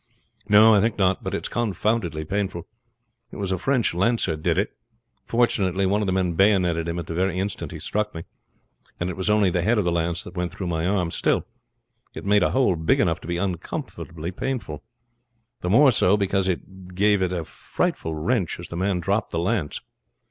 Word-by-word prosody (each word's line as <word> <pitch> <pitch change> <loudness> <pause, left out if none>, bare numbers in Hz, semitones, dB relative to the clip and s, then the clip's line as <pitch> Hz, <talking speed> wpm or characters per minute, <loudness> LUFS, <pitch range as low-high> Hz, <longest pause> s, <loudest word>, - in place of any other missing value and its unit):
"No, 110 +2 +7
I 100 - +5
think 110 +1 0
not; 95 -1 +1
but - - -3
it's - - -3
confoundedly 100 -7 -1
painful. 95 -2 -3 0.6
It - - -12
was 100 -2 -3
a 95 - -1
French 130 -2 +1
lancer 95 -2 +1
did 75 - -1
it. - - 0 0.5
Fortunately 100 -5 +1
one 100 +3 +1
of 105 - -1
the - - +1
men 90 -2 0
bayoneted 90 -3 +2
him 85 0 -3
at 85 - -4
the 85 - -5
very 90 +1 0
instant 95 +2 -3
he - - -6
struck 105 -2 -2
me, 80 - -5 0.8
and 85 +1 -1
it - - -7
was 95 +2 -1
only 105 -3 +3
the 90 - 0
head 115 +7 +2
of 105 - +1
the 85 - +1
lance 85 0 -1
that 90 - -11
went 90 -1 -2
through 95 +1 -6
my 85 -1 -1
arm. 90 -4 0
Still, - - +1 0.7
it - - -7
made 100 0 +4
a - - +3
hole 130 -8 +2
big 80 0 +1
enough - - +1
to - - -10
be 85 0 -1
uncommonly 85 -2 -4
painful; 105 - -4 0.8
the 90 - -3
more 135 +7 +6
so 105 -3 +3
because 95 -1 0
it 95 0 -5
gave 100 +1 +3
it 90 -1 +1
a 85 -3 -3
frightful 80 0 -3
wrench 90 +4 -1
as 85 - -8
the - - -6
man 95 -1 0
dropped 100 +5 0
the - - -4
lance. 85 -2 -1
95 Hz, 205 wpm, -24 LUFS, 85-105 Hz, 0.8 s, No